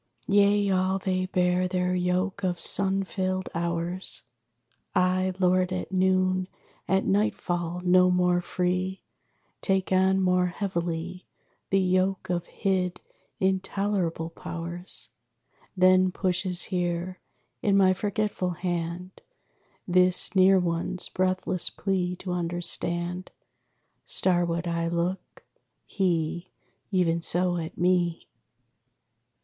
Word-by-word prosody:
Yea, 205 Hz, 0 st, +3 dB
all 185 Hz, 0 st, +1 dB
they 185 Hz, -1 st, -1 dB
bear 180 Hz, 0 st, +1 dB
their 180 Hz, 0 st, 0 dB
yoke 185 Hz, +2 st, -1 dB
of 180 Hz, -2 st, -1 dB
sun 195 Hz, 0 st, +1 dB
filled 185 Hz, -1 st, -3 dB
hours. 170 Hz, +2 st, -3 dB, 0.7 s
I, 185 Hz, +1 st, +2 dB
lord 185 Hz, 0 st, +2 dB
at 185 Hz, 0 st, -4 dB
noon, 185 Hz, 0 st, +2 dB, 0.4 s
at 190 Hz, 0 st, +1 dB
nightfall 180 Hz, -4 st, -1 dB
no 180 Hz, 0 st, +5 dB
more 180 Hz, -1 st, +2 dB
free, 185 Hz, +1 st, -2 dB, 0.6 s
Take 190 Hz, -1 st, 0 dB
on 190 Hz, +1 st, +3 dB
more 180 Hz, -1 st, +2 dB
heavily 175 Hz, -1 st, -4 dB, 0.4 s
The 195 Hz, -, +2 dB
yoke 185 Hz, 0 st, 0 dB
of 175 Hz, -1 st, -2 dB
hid, 185 Hz, -3 st, -1 dB, 0.4 s
intolerable 190 Hz, -3 st, -1 dB
Powers. 170 Hz, +2 st, -6 dB, 0.7 s
Then 185 Hz, 0 st, +5 dB
pushes 180 Hz, -1 st, +2 dB
here, 180 Hz, 0 st, -2 dB, 0.4 s
in 200 Hz, -1 st, +3 dB
my 190 Hz, -1 st, +5 dB
forgetful 200 Hz, -2 st, -2 dB
hand, 175 Hz, +1 st, -4 dB, 0.7 s
This 180 Hz, +2 st, +3 dB
near 190 Hz, +1 st, +6 dB
one's 175 Hz, 0 st, -2 dB
breathless 185 Hz, -1 st, 0 dB
plea 180 Hz, -2 st, -2 dB
to 180 Hz, 0 st, -6 dB
understand. 175 Hz, +1 st, -1 dB, 0.7 s
Starward 175 Hz, -2 st, +1 dB
I 170 Hz, 0 st, -1 dB
look; 170 Hz, +2 st, -3 dB, 0.4 s
he, 175 Hz, -2 st, -1 dB, 0.4 s
even 170 Hz, -4 st, +1 dB
so, 175 Hz, +1 st, +4 dB
at 160 Hz, -1 st, -6 dB
me! 175 Hz, -1 st, +1 dB
185 Hz, 105 wpm, -26 LUFS, 175-190 Hz, 0.7 s, near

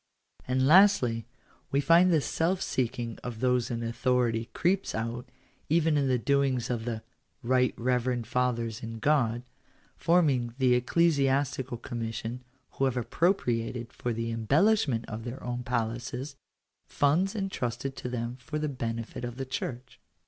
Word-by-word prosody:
And 130 Hz, +1 st, +2 dB
lastly, 135 Hz, -, +5 dB, 0.4 s
we 140 Hz, -, +1 dB
find 170 Hz, +5 st, +5 dB
this 155 Hz, -4 st, +2 dB
self 175 Hz, +3 st, 0 dB
seeking 120 Hz, -, -2 dB
of 120 Hz, -3 st, -6 dB
those 125 Hz, -1 st, +1 dB
in 115 Hz, -1 st, -3 dB
authority 115 Hz, 0 st, 0 dB
creeps 185 Hz, -, 0 dB
out, 115 Hz, +2 st, -4 dB, 0.4 s
even 160 Hz, 0 st, +3 dB
in 140 Hz, -2 st, +2 dB
the 130 Hz, -1 st, +2 dB
doings 130 Hz, -1 st, +1 dB
of 115 Hz, -2 st, -2 dB
the 115 Hz, -2 st, -4 dB, 0.2 s
" -, -, -43 dB
Bight 125 Hz, +1 st, +2 dB
Reverend 125 Hz, 0 st, 0 dB
Fathers 120 Hz, -2 st, -1 dB
in 115 Hz, 0 st, -6 dB
God" 120 Hz, -3 st, +1 dB, 0.5 s
forming 140 Hz, -9 st, +2 dB
the 130 Hz, -2 st, +4 dB
Ecclesiastical 135 Hz, -2 st, +1 dB
Commission, 115 Hz, +1 st, -5 dB, 0.3 s
who 135 Hz, -, 0 dB
have 130 Hz, -1 st, 0 dB
ap 120 Hz, -, -4 dB
propriated, 120 Hz, -, 0 dB
for 120 Hz, -, -3 dB
the 115 Hz, 0 st, -2 dB
embellishment 135 Hz, -, +2 dB
of 110 Hz, 0 st, -6 dB
their 120 Hz, +2 st, -7 dB
own 125 Hz, 0 st, -3 dB
palaces, 120 Hz, +3 st, -3 dB, 0.5 s
funds 175 Hz, +9 st, +2 dB
entrusted 135 Hz, -, -3 dB
to 125 Hz, -, -5 dB
them 120 Hz, 0 st, -3 dB
for 150 Hz, +4 st, -5 dB
the 150 Hz, 0 st, -1 dB
benefit 115 Hz, -4 st, -4 dB
of 120 Hz, -1 st, -4 dB
the 135 Hz, +1 st, -4 dB
Church. 130 Hz, -1 st, -5 dB
125 Hz, 150 wpm, -28 LUFS, 115-140 Hz, 0.5 s, lastly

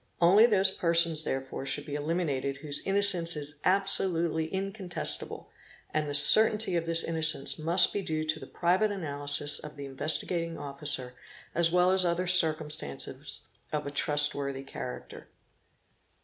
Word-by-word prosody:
Only 195 Hz, +7 st, +5 dB
those 195 Hz, -4 st, +3 dB
persons 170 Hz, -3 st, +2 dB
therefore 135 Hz, -3 st, -5 dB
should 145 Hz, +2 st, -3 dB
be 145 Hz, -, -8 dB
eliminated 145 Hz, -3 st, -3 dB
whose 145 Hz, 0 st, -3 dB
innocence 195 Hz, -4 st, +6 dB
is 145 Hz, 0 st, -6 dB
absolutely 170 Hz, -4 st, +1 dB
incontest 195 Hz, -1 st, -3 dB
able, -, -, -10 dB, 0.4 s
and 155 Hz, -1 st, -2 dB
the 145 Hz, -, -2 dB
certainty 210 Hz, +6 st, +5 dB
of 165 Hz, -1 st, -2 dB
this 165 Hz, 0 st, +3 dB
innocence 160 Hz, -3 st, -1 dB
must 170 Hz, +4 st, +4 dB
be 205 Hz, -, -2 dB
due 155 Hz, -4 st, -3 dB
to 155 Hz, 0 st, -3 dB
the -, -, -11 dB
private 185 Hz, +5 st, 0 dB
analysis 145 Hz, -5 st, -3 dB
of 150 Hz, -1 st, -11 dB
the 140 Hz, -1 st, -8 dB
Investigating 165 Hz, +4 st, -2 dB
Officer 140 Hz, -3 st, -6 dB, 0.4 s
as 170 Hz, 0 st, +2 dB
well 180 Hz, +1 st, +2 dB
as 190 Hz, 0 st, +2 dB
other 175 Hz, +1 st, -1 dB
circumstances 155 Hz, -, -1 dB, 0.3 s
of 150 Hz, -1 st, -3 dB
a 140 Hz, -, -6 dB
trust 145 Hz, 0 st, +1 dB
worthy 140 Hz, -1 st, -5 dB
character. 65 Hz, -, -9 dB
160 Hz, 150 wpm, -28 LUFS, 145-180 Hz, 0.4 s, innocence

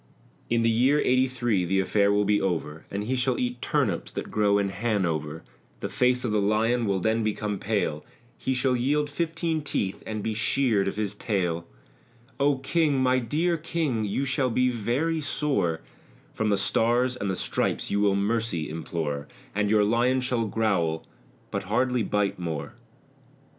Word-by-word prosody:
In 115 Hz, 0 st, +2 dB
the 115 Hz, -, +4 dB
year 130 Hz, +6 st, +3 dB
eighty 130 Hz, -1 st, +3 dB
three, 120 Hz, -7 st, 0 dB
the 95 Hz, +2 st, +1 dB
affair 100 Hz, +1 st, +2 dB
will 105 Hz, 0 st, +2 dB
be 105 Hz, 0 st, +2 dB
over 80 Hz, -4 st, -2 dB
And 100 Hz, +1 st, -3 dB
he 125 Hz, +5 st, -1 dB
shall 125 Hz, 0 st, +1 dB
eat 125 Hz, 0 st, -2 dB
turnips -, -, 0 dB
that -, -, -5 dB
grow 105 Hz, -1 st, +3 dB
in 100 Hz, -1 st, +1 dB
Hanover; 85 Hz, -7 st, -1 dB, 0.4 s
The -, -, -4 dB
face 125 Hz, 0 st, +2 dB
of 115 Hz, -, 0 dB
the 105 Hz, -1 st, +2 dB
Lion 110 Hz, +3 st, +2 dB
will 100 Hz, -1 st, +1 dB
then 110 Hz, +4 st, +1 dB
become 105 Hz, -1 st, -2 dB
pale, 100 Hz, -8 st, -1 dB, 0.3 s
He 130 Hz, -, -2 dB
shall 125 Hz, 0 st, +2 dB
yield 145 Hz, +4 st, +1 dB
fifteen 165 Hz, 0 st, -1 dB
teeth 100 Hz, -9 st, -2 dB
and 110 Hz, -2 st, -4 dB
be 110 Hz, -, -1 dB
sheared 110 Hz, -2 st, +1 dB
of -, -, -2 dB
his 105 Hz, -1 st, -2 dB
tail 90 Hz, -6 st, -2 dB, 0.7 s
O 140 Hz, 0 st, +3 dB
King, 145 Hz, +1 st, +1 dB
my 130 Hz, 0 st, +3 dB
dear 160 Hz, +8 st, 0 dB
King, 155 Hz, -8 st, -1 dB
you 105 Hz, +7 st, -1 dB
shall 130 Hz, -1 st, +1 dB
be 125 Hz, +2 st, +2 dB
very 135 Hz, +8 st, 0 dB
sore, 135 Hz, -, 0 dB, 0.5 s
From 110 Hz, -1 st, 0 dB
the 100 Hz, -, +3 dB
Stars 120 Hz, +5 st, +2 dB
and 100 Hz, -5 st, -3 dB
the 95 Hz, -, 0 dB
Stripes -, -, -1 dB
you 100 Hz, -, +1 dB
will 100 Hz, -1 st, +3 dB
mercy 100 Hz, -6 st, -1 dB
implore, 80 Hz, -3 st, -3 dB, 0.3 s
And 105 Hz, 0 st, 0 dB
your 105 Hz, -1 st, +4 dB
Lion 120 Hz, +5 st, +2 dB
shall 125 Hz, -3 st, 0 dB
growl, 95 Hz, -7 st, 0 dB, 0.5 s
but 100 Hz, -1 st, -3 dB
hardly 125 Hz, +4 st, +1 dB
bite 105 Hz, -2 st, 0 dB
more. 80 Hz, -4 st, -4 dB
110 Hz, 175 wpm, -26 LUFS, 100-130 Hz, 0.7 s, the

